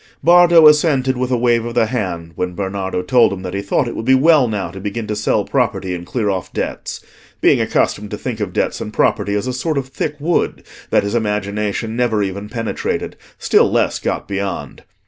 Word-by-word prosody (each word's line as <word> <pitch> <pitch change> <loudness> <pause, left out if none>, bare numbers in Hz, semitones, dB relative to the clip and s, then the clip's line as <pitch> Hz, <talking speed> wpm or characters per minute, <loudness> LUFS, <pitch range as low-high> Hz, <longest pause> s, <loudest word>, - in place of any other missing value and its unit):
Bardo 175 -1 +7
assented 145 -4 +3
with 125 0 -2
a 125 - +1
wave 120 -1 +2
of 120 0 -6
the - - +3
hand 90 -8 -3
when 90 +2 -3
Bernardo 95 -1 -3
told 120 +6 +4
him 95 -1 -6
that 90 -1 -5
he 100 - -2
thought 100 +6 0
it 120 - -5
would - - -4
be 130 +3 +4
well 145 -1 +5
now 100 -6 -3
to 95 - -9
begin 105 +3 -4
to 105 - -3
sell - - 0
property 90 -1 -1
and 85 -1 -6
clear 115 -1 -2
off 95 -3 -2
debts; - - -5 0.3
being - - +4
accustomed 105 0 0
to 105 - -5
think 120 -2 -5
of 100 -4 -3
debts - - -1
and - - -6
property 100 - +1
as 105 - -1
a 130 - -2
sort 150 +4 -2
of 135 -1 -3
thick 150 +2 -3
wood 165 +4 -1 0.3
that - - +3
his 100 - -3
imagination 105 0 -2
never 115 -4 +1
even 100 +2 -5
penetrated, 115 -2 -3 0.2
still - - +3
less - - +1
got - - -3
beyond. 100 -1 -4
110 Hz, 210 wpm, -18 LUFS, 100-130 Hz, 0.3 s, Bardo